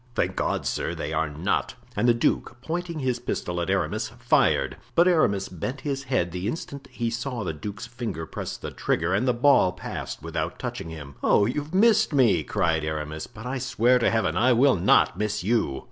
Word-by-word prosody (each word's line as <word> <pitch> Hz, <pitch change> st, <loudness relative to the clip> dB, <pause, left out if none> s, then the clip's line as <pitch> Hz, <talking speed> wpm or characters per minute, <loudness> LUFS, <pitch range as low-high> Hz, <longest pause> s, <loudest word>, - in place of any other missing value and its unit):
"Thank -, -, 0 dB
God, -, -, -1 dB
sir, -, -, -2 dB
they -, -, -4 dB
are 80 Hz, -, 0 dB
not!" 75 Hz, +2 st, -1 dB, 0.2 s
And 120 Hz, -, +1 dB
the 120 Hz, -, +6 dB
duke, 120 Hz, +1 st, 0 dB
pointing 170 Hz, +1 st, -3 dB
his 130 Hz, -2 st, 0 dB
pistol 90 Hz, 0 st, -3 dB
at 85 Hz, -, -3 dB
Aramis, 95 Hz, -5 st, 0 dB
fired. -, -, +2 dB, 0.2 s
But 170 Hz, +2 st, +5 dB
Aramis 100 Hz, -, +3 dB
bent 125 Hz, -, -5 dB
his 135 Hz, -2 st, -3 dB
head 125 Hz, -10 st, 0 dB
the 90 Hz, +3 st, -3 dB
instant 140 Hz, +1 st, -5 dB
he 115 Hz, -1 st, -2 dB
saw 120 Hz, -1 st, -3 dB
the -, -, -2 dB
duke's 105 Hz, -, -6 dB
finger 115 Hz, -8 st, -5 dB
press -, -, -6 dB
the -, -, -7 dB
trigger 85 Hz, +3 st, 0 dB
and 110 Hz, +7 st, +1 dB
the 125 Hz, -, +4 dB
ball 125 Hz, -7 st, +5 dB
passed -, -, -6 dB
without 80 Hz, -1 st, -3 dB
touching 80 Hz, -, -5 dB
him. 70 Hz, -4 st, -9 dB
"Oh! 100 Hz, -, +4 dB
you've 150 Hz, -, -3 dB
missed 215 Hz, -2 st, +4 dB
me," 130 Hz, -6 st, +4 dB
cried 80 Hz, -2 st, 0 dB
Aramis, 75 Hz, 0 st, -4 dB
"but 110 Hz, -1 st, -12 dB
I 130 Hz, +1 st, -2 dB
swear 125 Hz, 0 st, +3 dB
to -, -, +3 dB
Heaven! 95 Hz, -7 st, 0 dB
I 125 Hz, +7 st, +4 dB
will 130 Hz, +3 st, +5 dB
not 90 Hz, -, +3 dB
miss 105 Hz, -4 st, -1 dB
you." 100 Hz, -, +1 dB
115 Hz, 200 wpm, -25 LUFS, 85-130 Hz, 0.2 s, the